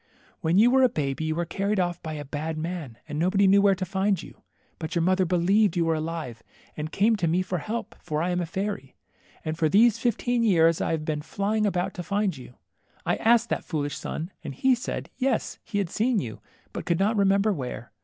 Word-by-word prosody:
When 170 Hz, 0 st, +1 dB
you 230 Hz, +4 st, +6 dB
were 265 Hz, +1 st, +5 dB
a 255 Hz, -, +6 dB
baby 145 Hz, -, -2 dB
you 155 Hz, 0 st, -1 dB
were 175 Hz, +1 st, -1 dB
carried 200 Hz, +4 st, -1 dB
off 175 Hz, -1 st, -1 dB
by 160 Hz, -1 st, -5 dB
a 145 Hz, -1 st, -6 dB
bad 155 Hz, +3 st, -4 dB
man, 160 Hz, -7 st, -5 dB
and 150 Hz, -1 st, -4 dB
nobody 190 Hz, +4 st, +3 dB
knew 200 Hz, +1 st, +6 dB
where 200 Hz, -1 st, +4 dB
to 185 Hz, 0 st, -3 dB
find 190 Hz, +1 st, 0 dB
you. -, -, -11 dB, 0.4 s
But 165 Hz, +1 st, -5 dB
your 170 Hz, -, +2 dB
mother 185 Hz, +1 st, +3 dB
believed 190 Hz, +4 st, +3 dB
you^ 170 Hz, -, +2 dB
were 165 Hz, 0 st, +2 dB
alive, 155 Hz, -7 st, -4 dB, 0.3 s
and 155 Hz, +1 st, -5 dB
came 220 Hz, +3 st, +3 dB
to 175 Hz, -4 st, 0 dB
me 175 Hz, +3 st, +2 dB
for 180 Hz, -1 st, -2 dB
help, 225 Hz, +9 st, -4 dB
for 150 Hz, -3 st, -2 dB
I 180 Hz, -, 0 dB
am 180 Hz, 0 st, 0 dB
a 170 Hz, -, -3 dB
fairy. 190 Hz, -5 st, -4 dB, 0.5 s
And 155 Hz, +1 st, -3 dB
for 160 Hz, -2 st, +3 dB
these 225 Hz, +4 st, +5 dB
fifteen 240 Hz, +1 st, 0 dB
years 165 Hz, -7 st, +4 dB
I -, -, 0 dB
have 160 Hz, -1 st, -1 dB
been 150 Hz, -1 st, -2 dB
flying 210 Hz, +6 st, 0 dB
about 185 Hz, 0 st, -1 dB
to 180 Hz, -, -5 dB
find 195 Hz, -1 st, 0 dB
you. 125 Hz, -2 st, -12 dB, 0.5 s
I -, -, +1 dB
asked 235 Hz, +1 st, +3 dB
that -, -, -1 dB
foolish 145 Hz, -4 st, -3 dB
sun, 160 Hz, +5 st, -5 dB
and 140 Hz, -, -6 dB
he 260 Hz, -, +3 dB
said, 245 Hz, +1 st, -4 dB
yes, 255 Hz, -3 st, -1 dB
he 215 Hz, -, -4 dB
had 195 Hz, -4 st, -1 dB
seen 235 Hz, +2 st, +1 dB
you, 115 Hz, -, -4 dB, 0.3 s
but -, -, -6 dB
could 170 Hz, -, +2 dB
not 205 Hz, +5 st, +2 dB
remember 200 Hz, +1 st, +3 dB
where. 125 Hz, -, -6 dB
180 Hz, 230 wpm, -26 LUFS, 160-205 Hz, 0.5 s, you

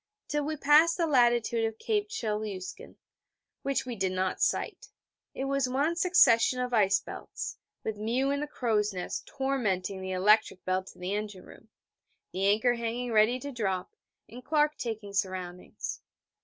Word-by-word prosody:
Till 295 Hz, 0 st, -1 dB
we 310 Hz, +1 st, -3 dB
passed 300 Hz, +4 st, +5 dB
the 340 Hz, -, +2 dB
latitude 240 Hz, -5 st, +3 dB
of 225 Hz, 0 st, -2 dB
Cape 420 Hz, -, -1 dB
Chelyuskin 210 Hz, -, -4 dB, 0.7 s
(which 275 Hz, -1 st, -1 dB
we 245 Hz, -2 st, -4 dB
did 190 Hz, -2 st, 0 dB
not 185 Hz, 0 st, -1 dB
sight), -, -, -1 dB, 0.5 s
it 270 Hz, -, -3 dB
was 275 Hz, -2 st, 0 dB
one 285 Hz, +6 st, +1 dB
succession 255 Hz, -9 st, +4 dB
of 250 Hz, 0 st, -2 dB
ice 195 Hz, -3 st, +4 dB
belts, -, -, -7 dB, 0.2 s
with 220 Hz, -1 st, -3 dB
Mew 240 Hz, +6 st, 0 dB
in 280 Hz, -, 0 dB
the 295 Hz, -, -3 dB
crow's 215 Hz, -7 st, 0 dB
nest 180 Hz, -1 st, -5 dB
tormenting 210 Hz, -9 st, -1 dB
the 190 Hz, -, -5 dB
electric 200 Hz, 0 st, +3 dB
bell 185 Hz, 0 st, 0 dB
to -, -, -14 dB
the 180 Hz, +2 st, -3 dB
engine 210 Hz, -3 st, -4 dB
room, 220 Hz, -, -16 dB, 0.6 s
the 190 Hz, +2 st, 0 dB
anchor 220 Hz, +5 st, +3 dB
hanging 235 Hz, +1 st, -3 dB
ready 220 Hz, +3 st, +4 dB
to 285 Hz, -, -5 dB
drop, 190 Hz, -7 st, -2 dB, 0.3 s
and 245 Hz, +2 st, -11 dB
Clark 300 Hz, +2 st, +2 dB
taking 215 Hz, -4 st, -5 dB
soundings. 185 Hz, -2 st, -4 dB
230 Hz, 160 wpm, -29 LUFS, 200-275 Hz, 0.7 s, passed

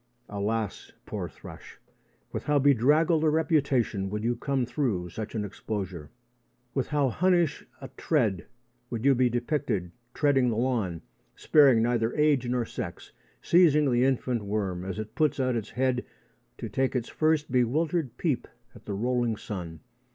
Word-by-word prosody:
Alas, 105 Hz, +2 st, -3 dB
poor -, -, -4 dB
thrush, -, -, -12 dB, 0.5 s
with -, -, -5 dB
how 150 Hz, 0 st, +2 dB
bedraggled 145 Hz, +5 st, +4 dB
a 155 Hz, -, +4 dB
reputation 140 Hz, -, +1 dB
you -, -, -4 dB
would 115 Hz, +4 st, -2 dB
come 135 Hz, -2 st, 0 dB
through 120 Hz, -, -2 dB
such 110 Hz, +4 st, -6 dB
an 105 Hz, -2 st, -1 dB
exposure! 95 Hz, -6 st, -5 dB, 0.6 s
With 135 Hz, -, -1 dB
how 145 Hz, -3 st, +1 dB
Hunnish 175 Hz, +1 st, +1 dB, 0.2 s
a 135 Hz, -, -6 dB
tread 110 Hz, -, 0 dB, 0.4 s
you 115 Hz, -2 st, -4 dB
would -, -, +3 dB
be 125 Hz, 0 st, +3 dB
depicted 120 Hz, -, -1 dB, 0.2 s
treading 135 Hz, -4 st, +3 dB
the 110 Hz, -, -1 dB
lawn, 115 Hz, -9 st, -1 dB, 0.3 s
sparing 135 Hz, -7 st, +5 dB
neither 120 Hz, -1 st, 0 dB
age 150 Hz, -4 st, +2 dB
nor 125 Hz, -1 st, 0 dB
sex, -, -, -7 dB, 0.3 s
seizing 150 Hz, -5 st, +4 dB
the 120 Hz, 0 st, +3 dB
infant 125 Hz, -3 st, 0 dB
worm 100 Hz, -3 st, -2 dB
as 95 Hz, 0 st, -5 dB
it 110 Hz, 0 st, -6 dB
puts 155 Hz, -3 st, +1 dB
out 130 Hz, -2 st, +1 dB
its 110 Hz, -2 st, -3 dB
head 125 Hz, 0 st, 0 dB, 0.5 s
to 115 Hz, -, -5 dB
take 130 Hz, +6 st, -1 dB
its 125 Hz, -2 st, -1 dB
first 155 Hz, -3 st, 0 dB
bewildered 135 Hz, +2 st, 0 dB
peep 145 Hz, -9 st, -1 dB, 0.3 s
at -, -, -16 dB
the 100 Hz, -, -4 dB
rolling 120 Hz, +1 st, 0 dB
sun! 85 Hz, -7 st, -7 dB
125 Hz, 155 wpm, -27 LUFS, 110-145 Hz, 0.6 s, sparing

